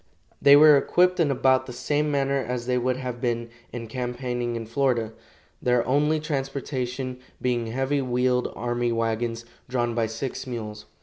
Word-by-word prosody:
They 140 0 +8
were 150 0 +8
equipped 180 +5 +2
in 160 -4 +3
about 130 -1 +2
the 125 - -7
same 145 +4 0
manner 140 -1 +1
as 125 -1 -3
they 125 0 +1
would 125 +1 0
have 125 -2 -5
been 120 -2 -1 0.2
in 120 -1 -5
campaigning 120 0 -3
in 115 -1 -4
Florida, 115 -2 0 0.5
their 125 -2 +2
only 150 +4 +2
transportation 135 -3 -3 0.2
being 120 -2 0
heavy 135 +4 0
wheeled 125 0 +1
army 120 0 -1
wagons, 115 0 -1 0.2
drawn 120 -2 0
by 115 -1 0
six 130 +4 -5
mules. 110 -4 -6
125 Hz, 160 wpm, -25 LUFS, 120-135 Hz, 0.5 s, They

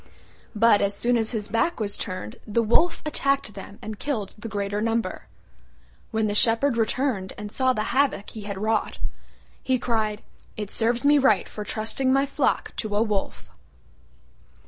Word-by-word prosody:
But 220 -1 +5
as 200 0 +1
soon 245 +3 +2
as 225 -1 +1
his 215 -3 -3
back 230 +10 0
was 205 -2 -1
turned 185 - -5
the 230 +2 +1
Wolf 320 +10 +3
attacked 275 -5 0
them 200 +1 -10
and 215 -1 -6
killed 225 -9 -3
the 225 +1 -7
greater 205 0 -2
number. 225 +1 -1 0.8
When 220 -1 0
the 205 - 0
Shepherd 230 +4 +3
returned 225 -3 0
and 210 0 -6
saw 260 +2 +2
the 215 - -1
havoc 265 -7 +1
he 220 - -8
had 200 -1 -5
wrought, 215 +2 0 0.6
he 260 -1 +1
cried, 220 -3 -1 0.3
"It 210 -2 -4
serves 235 +3 +2
me 290 0 +6
right 220 -8 +3
for 210 - -6
trusting 225 +5 0
my 275 +1 +4
flock 280 - 0
to 215 -2 -2
a 210 - +4
Wolf." 210 -3 -3
220 Hz, 170 wpm, -25 LUFS, 205-250 Hz, 0.8 s, me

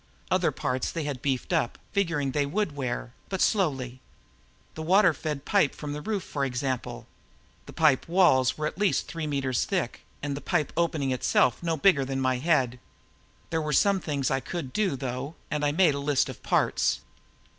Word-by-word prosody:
Other - - +3
parts 125 0 -2
they 165 - -3
had 140 -4 -4
beefed 135 -3 -1
up, 115 - 0
figuring 165 -8 0
they 145 +1 0
would 175 -1 -1
wear, 120 - -3 0.2
but 190 - -2
slowly. 135 - 0 0.7
The 160 - -7
water 185 +2 +5
feed 150 -3 -4
pipe 195 -9 +2
from 145 -1 -5
the 150 - -5
roof, 205 +1 -2
for 140 - -3
example. 130 - -3 0.6
The - - -10
pipe 150 -5 +3
walls 150 -8 +4
were 155 - -2
at 155 - -4
least 205 -2 +1
three 165 -2 -4
meters 135 -4 0
thick - - -2 0.2
and 140 -1 -2
the 140 - -6
pipe 150 - 0
opening 160 -5 0
itself 125 -1 +2
no 165 -2 -1
bigger 145 -3 +4
than 135 0 -3
my 130 -1 +1
head. 130 -5 +1 0.7
There 160 -1 +1
were 150 -1 -2
some 200 +6 +4
things 145 -6 -1
I 135 - +2
could 135 0 -5
do, 200 -8 +1
though, 130 +3 -4 0.2
and 150 -1 -1
I 145 - +3
made 165 -1 +4
a 140 - -3
list 145 0 +1
of 130 - -9
parts. - - +1
145 Hz, 190 wpm, -27 LUFS, 130-165 Hz, 0.7 s, water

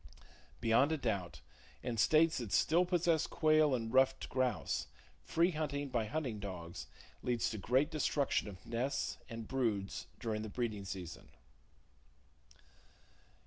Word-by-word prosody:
Beyond 115 +6 +4
a 160 - +1
doubt, 95 - -2 0.4
in 120 -2 -2
states 155 +6 +4
that 115 -5 -5
still 170 - +4
possess 170 -3 +2
quail 155 -3 +4
and 115 -1 -4
ruffed 135 0 +3
grouse, 125 - 0 0.3
free 170 - +2
hunting 145 -3 -2
by 120 -3 0
hunting 125 -4 -2
dogs 85 -9 -6 0.3
leads 120 -2 0
to 110 - -4
great 130 +8 +2
destruction 145 -5 +1
of 95 -2 -10
nests 125 +4 -2
and 115 -2 -6
broods 110 -7 -1
during 110 -3 -2
the 110 - -5
breeding 110 -3 -3
season. 95 -3 -7
125 Hz, 130 wpm, -35 LUFS, 105-145 Hz, 0.4 s, Beyond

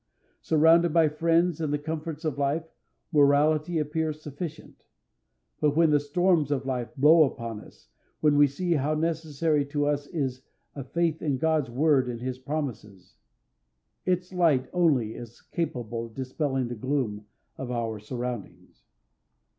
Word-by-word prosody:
Surrounded 165 +2 +4
by 165 -1 +4
friends 165 +2 +1
and 155 -2 -1
the 150 - +1
comforts 160 +1 -5
of 145 -3 -2
life, 145 +4 0 0.5
morality 150 +2 +3
appears 155 0 -2
sufficient; 150 +2 -8 0.8
but 150 -1 +2
when 165 -2 +5
the 145 - +4
storms 160 +1 +1
of 135 -2 -1
life 125 -3 -2
blow 155 +4 +6
upon 115 -6 -1
us, - - -17 0.4
then 150 -1 +4
we 145 0 +6
see 175 +6 -3
how 150 0 0
necessary 160 -2 0
to 145 +1 -1
us 145 -1 -1
is 135 -6 -3 0.3
a 140 - -6
faith 165 +3 -1
in 145 -4 0
God's 155 -3 +1
Word 135 0 +2
and 120 -1 -5
his 130 +1 -4
promises. 125 - -6 0.9
Its 180 0 -1
light 155 -8 +2
only 145 -11 +2
is 120 -1 -10
capable 120 -8 -4
of 110 - -19
dispelling 135 0 -2
the 120 - -5
gloom 110 -4 -2 0.3
of 130 - -6
our 115 -3 -2
surroundings. 120 0 -7
145 Hz, 145 wpm, -27 LUFS, 130-160 Hz, 0.9 s, blow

